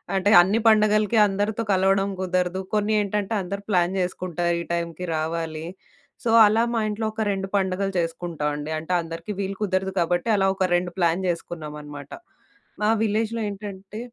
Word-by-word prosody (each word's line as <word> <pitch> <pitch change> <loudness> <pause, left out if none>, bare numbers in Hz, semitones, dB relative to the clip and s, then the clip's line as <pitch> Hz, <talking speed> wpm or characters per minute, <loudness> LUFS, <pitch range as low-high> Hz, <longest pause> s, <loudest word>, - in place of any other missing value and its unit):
అంటే, 195 +2 +2
అన్ని 195 +5 +1
పండగలకి 215 0 +4
అందరితో 205 +3 -1
కలవడం 195 +1 +2
కుదరదు. 185 0 0
కొన్ని 210 +1 +1
ఏంటంటే, 205 +1 -2
అందరు 195 +2 -5
ప్లాన్ 180 -1 +2
చేసుకుంటారు, 175 -1 -1
ఈ - - -13
టైమ్‌కి 170 +1 -3
రావాలి. 160 0 -3 0.6
సో, 235 - 0 0.2
అలా 220 +2 +3
మా 230 - +1
ఇంట్లో 215 +1 -3
ఒక 220 - -4
2 195 -1 -3
పండగలు 195 0 -1
చేసుకుంటావండి. 160 -3 -3
అంటే, 160 +3 -7
అందరికీ 165 +4 -7
వీలు 195 0 -4
కుదరదు 190 -1 -1
కాబట్టి, 175 +5 0
అలా 195 -1 +2
ఒక 190 -1 +1
2 175 0 -1
ప్లాన్ 170 +2 +1
జేసుకున్నామనమాట. 150 -4 -6 0.7
మా 210 - +3
విలేజ్‌లో 225 +1 0
ఏంటంటే, 200 +1 -8
190 Hz, 150 wpm, -24 LUFS, 170-205 Hz, 0.7 s, పండగలకి